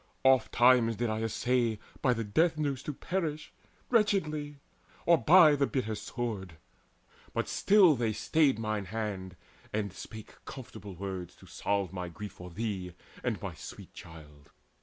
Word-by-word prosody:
Oftentimes 125 -2 +5
did 120 0 -1
I 110 0 -2
essay 115 0 0 0.2
By 125 -3 +3
the 115 - -2
death 155 +10 +2
noose 140 -4 -1
to 150 - -4
perish 155 -1 -3 0.4
wretchedly, 155 - +1 0.5
Or 170 -2 +5
by 160 -3 +7
the 140 -1 +1
bitter 120 -5 -2
sword; 105 -7 -5 0.8
but - - 0
still 195 -6 +5
they 115 -3 0
stayed 140 +4 +2
Mine 110 -2 -2
hand, 95 -3 -4 0.4
and 105 -3 -2
still - - -9
spake 110 -2 -11
comfortable 105 -6 -9
words 95 -1 -6
To - - -17
salve 100 -2 -2
my 90 -2 -4
grief 105 +3 -8
for 90 0 -10
thee 95 -2 -4 0.3
and - - -1
my - - -4
sweet - - -10
child. 75 -3 -13
115 Hz, 150 wpm, -30 LUFS, 100-145 Hz, 0.8 s, by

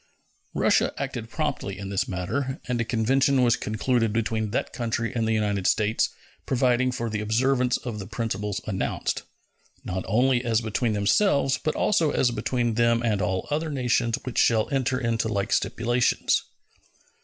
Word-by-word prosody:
Russia - - +3
acted 125 -5 -4
promptly 145 - -3
in 100 0 -6
this 100 -1 -1
matter, 130 +9 -3
and 125 -2 0
a - - +2
convention 130 +4 +2
was 120 -1 +4
concluded 115 +1 0
between 110 -1 -1
that 115 - -2
country 115 -2 -2
and 115 -2 0
the - - +1
United 105 -3 0
States 105 +1 +2 0.4
providing 130 0 +2
for 120 -1 -3
the 105 -1 -2
observance 125 +4 +2
of 115 -4 -6
the 100 - -6
principles 110 -3 -3
announced, 95 -3 -2 0.6
not 95 0 -3
only 125 +4 +2
as 115 -2 +2
between 110 0 -1
themselves, 135 - +2
but 155 - 0
also 170 -7 +2
as 125 -3 +2
between 120 +1 -1
them 115 +1 +2
and 105 -4 +1
all 95 +1 -1
other 155 +2 -1
nations 125 -4 +1
which 125 - -2
shall 110 -2 +3
enter 130 -2 0
into 115 -2 0
like 100 -1 -1
stipulations. 120 +1 +1
115 Hz, 160 wpm, -25 LUFS, 110-130 Hz, 0.6 s, was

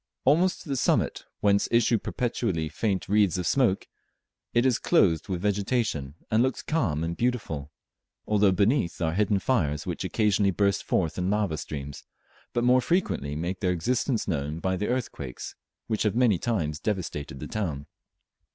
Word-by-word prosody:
Almost 170 +7 +3
to - - -12
the 140 - 0
summit, 125 - +1 0.2
whence 100 -1 +3
issue 115 -1 +3
perpetually 105 - -2
faint 100 -1 -1
wreaths 100 -2 +3
of 90 - -2
smoke, 115 0 +2 0.6
it 120 +1 +2
is 130 -3 +3
clothed 85 -1 +2
with 90 -2 -2
vegetation, 100 - -1 0.2
and 110 +1 +4
looks 130 0 0
calm 95 - 0
and 85 +1 -2
beautiful, 100 - -2 0.5
although 105 -2 +3
beneath 100 - +1
are 80 -2 0
hidden 100 +2 +2
fires 80 - 0
which - - -3
occasionally 105 -2 +2
burst 100 +1 +1
forth 85 -1 0
in 90 +1 0
lava 105 -5 +1
streams, 70 -2 -6 0.5
but 120 - 0
more 125 +1 +5
frequently 125 - 0
make 85 +4 -3
their 95 - 0
existence 120 - 0
known 75 -3 -2
by 95 +2 -1
the 105 +3 -2
earthquakes 115 - -4 0.3
which 110 -2 -2
have 105 -1 +1
many 115 -7 +3
times 80 -11 -1
devastated 75 -8 -3
the - - -6
town. 80 -10 -3
100 Hz, 160 wpm, -27 LUFS, 80-115 Hz, 0.6 s, more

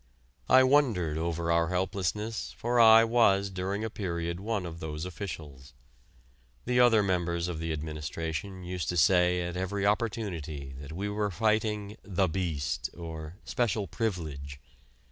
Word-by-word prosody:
I 130 0 +8
wondered 115 - +2
over 85 0 -1
our 85 0 +3
helplessness, 95 +4 -2
for 120 +1 0
I 115 0 +9
was 100 -4 +3
during 95 +3 -3
a 110 - -2
period 85 -4 -3
one 105 -2 -2
of 85 -1 -7
those 80 +1 -5
officials. 75 -8 -8 0.9
The 125 0 +2
other 115 -4 +6
members 85 -3 0
of 85 -3 -4
the 80 0 -3
administration 80 +4 -4
used 90 -4 -3
to 90 - -1
say 90 +2 +4
at 85 0 -4
every 95 +2 -2
opportunity 95 - -2
that 70 0 -9
we 95 +5 -3
were 105 0 -1
fighting 105 +1 0
"The 95 -1 0
Beast" 75 -8 -2
or 80 -1 -7
"Special 110 -4 0
Privilege." 75 - -4
90 Hz, 145 wpm, -29 LUFS, 80-105 Hz, 0.9 s, I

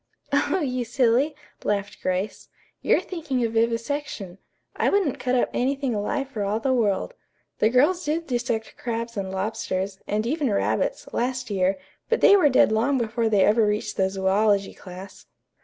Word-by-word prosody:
"Oh, 375 - +2
you 255 -4 -1
silly," 250 +5 +2 0.3
laughed 205 -1 -2
Grace. 185 +3 -2 0.3
"You're - - +3
thinking 300 -9 -3
of 225 - -3
vivisection. 230 -4 -2 0.4
I - - +2
wouldn't 385 -10 +1
cut 255 0 0
up 245 - +1
anything 270 0 0
alive 270 +7 -2
for 225 -6 -4
all 205 +2 0
the 260 +3 +1
world. 225 - 0 0.5
The 215 - +4
girls 295 +9 +3
did 320 +3 -1
dissect 240 -4 -2
crabs 230 0 -3
and 195 -2 -3
lobsters, 190 -1 -3
and 215 +1 -1
even 290 +1 0
rabbits, - - 0
last 250 -1 -2
year, 190 0 +1 0.3
but 470 - +2
they 405 - +8
were 345 -7 +5
dead 255 -4 +4
long 240 +6 +2
before 230 -1 0
they 205 -3 +4
ever 220 +2 +4
reached 210 0 -1
the 190 - +2
zoölogy 195 +1 +1
class." 185 +1 -11
230 Hz, 165 wpm, -24 LUFS, 205-270 Hz, 0.5 s, they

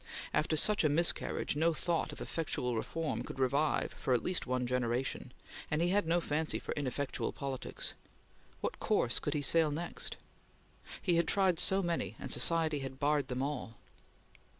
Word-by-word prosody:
After 155 +1 +1
such 210 +5 +6
a 155 - +4
miscarriage, 165 -1 +1
no 165 +2 +2
thought 170 0 -1
of - - -10
effectual 125 -6 -2
reform 160 +8 -2
could - - -7
revive 140 +4 +1
for 130 - 0
at 120 - -1
least 180 -6 -1
one 125 0 0
generation, 125 +1 -1 0.4
and 150 - 0
he 170 +1 +2
had 195 -2 +2
no 170 +1 +3
fancy 155 -1 -1
for - - -6
ineffectual 140 -1 -2
politics. 135 -2 -5 0.7
What - - -3
course - - +1
could - - -2
he 145 - -1
sail 165 +1 +4
next? 165 +4 -4 0.9
He 175 -3 +3
had 170 - +2
tried 190 -4 +3
so 190 +2 +5
many, 165 - -2
and - - -6
society 160 -3 +3
had 135 -1 -7
barred 145 -1 +1
them 130 -1 -2
all! 140 -5 -4
150 Hz, 170 wpm, -33 LUFS, 130-165 Hz, 0.9 s, such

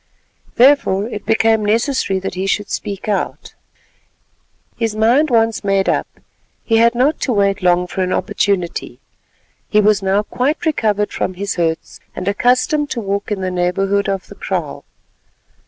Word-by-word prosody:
Therefore 240 -6 +4
it 210 -3 -7
became 225 -1 +3
necessary 225 -1 0
that 190 - -4
he 190 +1 -3
should 205 +1 -1
speak 200 0 -4
out. 205 -3 -3 1.2
His 225 -2 -2
mind 240 +8 +3
once 225 -2 +1
made 195 -1 +1
up, - - +1 0.6
he 225 - +2
had 235 +1 +4
not 275 +6 +2
to 260 - -1
wait 200 -2 +1
long 180 0 +3
for 185 +2 -4
an 185 0 -1
opportunity. 185 -2 -1 0.7
He 210 - +3
was 210 -1 +3
now 195 +2 +1
quite 280 +10 -2
recovered 210 -9 0
from 185 - -2
his 200 +2 -3
hurts, 165 -2 -2 0.2
and 180 - -5
accustomed 255 +8 +1
to 245 - -3
walk 200 0 -3
in 200 -2 -2
the 185 0 -2
neighbourhood 195 +3 0
of 195 -1 -2
the - - -12
kraal. - - -4
210 Hz, 155 wpm, -17 LUFS, 195-230 Hz, 1.2 s, Therefore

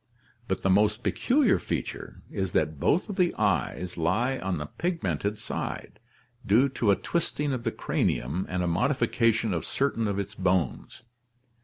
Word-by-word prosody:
But 95 - -1
the 95 - +2
most 105 +2 +3
peculiar 255 -3 +3
feature - - -5
is 95 -2 -2
that 80 -2 0
both 165 - +2
of 205 - -6
the 180 -2 +2
eyes 90 -3 0
lie 110 +11 +1
on 95 -2 -2
the 75 - -4
pigmented 105 - -2
side, 105 - -5 0.4
due 120 +6 +4
to 120 -4 0
a 100 - +6
twisting 150 - -1
of 125 -2 -4
the 115 - +1
cranium 80 - -1
and 90 -1 -1
a - - 0
modification 115 - +1
of 85 - -2
certain 125 -5 0
of 100 -1 -1
its 100 +1 -3
bones. 95 - -1
105 Hz, 160 wpm, -27 LUFS, 90-130 Hz, 0.4 s, a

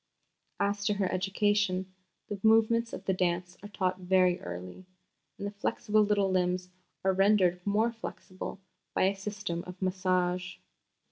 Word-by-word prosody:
As 200 0 0
to 210 - +2
her 195 -2 0
education, 190 0 +1 0.3
the 205 - -5
movements 225 +1 +4
of 195 - -7
the 190 - +2
dance 180 -1 -1
are 205 - -9
taught 185 -2 -1
very 180 -1 +3
early, 90 - -8 0.5
and 200 - -5
the 205 - -3
flexible 210 +1 +1
little 205 -2 +2
limbs 180 0 0 0.4
are 190 - +4
rendered 190 -2 +3
more 215 +3 +2
flexible 195 -4 -7 0.4
by - - +3
a 195 +1 +3
system 195 -4 -4
of 180 0 -9
massage. 185 -1 0
190 Hz, 145 wpm, -30 LUFS, 180-205 Hz, 0.5 s, movements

